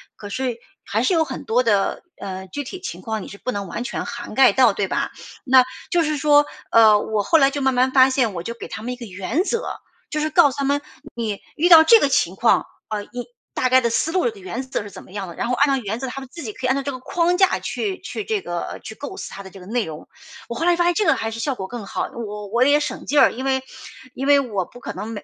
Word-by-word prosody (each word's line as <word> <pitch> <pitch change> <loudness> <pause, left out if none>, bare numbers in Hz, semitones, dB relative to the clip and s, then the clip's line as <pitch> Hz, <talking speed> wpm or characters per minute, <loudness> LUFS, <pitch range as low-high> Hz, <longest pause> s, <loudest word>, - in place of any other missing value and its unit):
可 205 - -9
是 250 +2 -2 0.3
还 - - -1
是 385 - +2
有 325 -2 +4
很 270 -4 -6
多 245 +3 +2
的 205 -4 +1
呃， 190 -1 -6
具 285 +10 -5
体 370 +8 -7
情 - - -6
况 220 -3 -3
你 - - -9
是 200 - -10
不 255 - -3
能 200 -4 -4
完 210 +7 -4
全 - - -4
涵 240 -1 -7
盖 265 - +7
到 250 -5 +5
对 195 -1 -1
吧？ - - -1 0.3
那 260 -1 +7 0.3
就 345 -1 +2
是 305 -1 -1
说， 290 +1 +5 0.3
呃， 215 -2 +7
我 215 -1 -1
后 325 - +4
来 275 -2 +5
就 285 0 -3
慢 265 0 +2
慢 255 +1 +2
发 260 -1 +7
现， 255 -5 +1
我 170 -1 -5
就 235 - -4
给 235 - -9
他 215 - -7
们 245 - -3
一 - - -6
个 240 - -8
原 200 - -2
则， 465 +2 -1 0.5
就 305 - -2
是 310 +1 0
告 310 -3 +5
诉 - - -9
他 280 - -1
们， 285 +1 +1 0.3
你 220 -4 -3 0.2
遇 345 +4 +2
到 325 -2 +10
这 455 +7 +8
个 - - +4
情 185 -8 +1
况， 230 +4 +3 0.2
呃， 210 -1 -3
一 245 0 -7 0.3
大 255 - +1
概 260 +1 +6
的 235 -2 0
思 300 +7 0
路 370 +5 +2
的 440 - -11
原 375 -9 -5
则 260 -5 -3
是 205 - -10
怎 - - -10
么 - - -17
样 195 -2 -5
的。 170 - -10
然 - - -2
后 250 - +1
按 280 - +4
照 265 - -2
原 215 +1 -3
则， 265 +2 -4
他 260 - -5
们 265 -1 -10
自 335 -3 -8
己 220 - -4
可 255 +4 -4
以 - - 0
按 260 - +3
照 275 - -2
这 280 - -3
个 255 - -7
框 345 +6 +1
架 380 -1 +4
去 390 -3 -3
去 420 - -5
这 435 -3 -1
个 175 - -5
去 220 - -8
构 285 +10 -7
思 - - -7
它 200 - -8
的 190 - -10
这 190 -1 -13
个 - - -12
内 230 +3 -1
容。 155 -1 -9 0.4
我 235 - -4
后 330 - -2
来 350 0 +4
发 345 - +2
现 350 0 +3
这 415 +2 +1
个 - - +4
还 225 0 -3
是 230 - -6
效 260 +3 -1
果 190 - -5
更 235 -1 -7
好， - - -3
我 210 -3 -6
我 235 +5 +2
也 290 +2 +4
省 - - -4
劲 295 - -1
儿。 - - +6
因 260 +3 -6
为 265 -1 +1 0.5
因 270 - -4
为 285 -1 +6
我 205 -8 -2
不 245 - -15
可 - - -5
能 205 +4 -6
每 225 -2 -6
255 Hz, 315 characters per minute, -22 LUFS, 215-290 Hz, 0.5 s, 到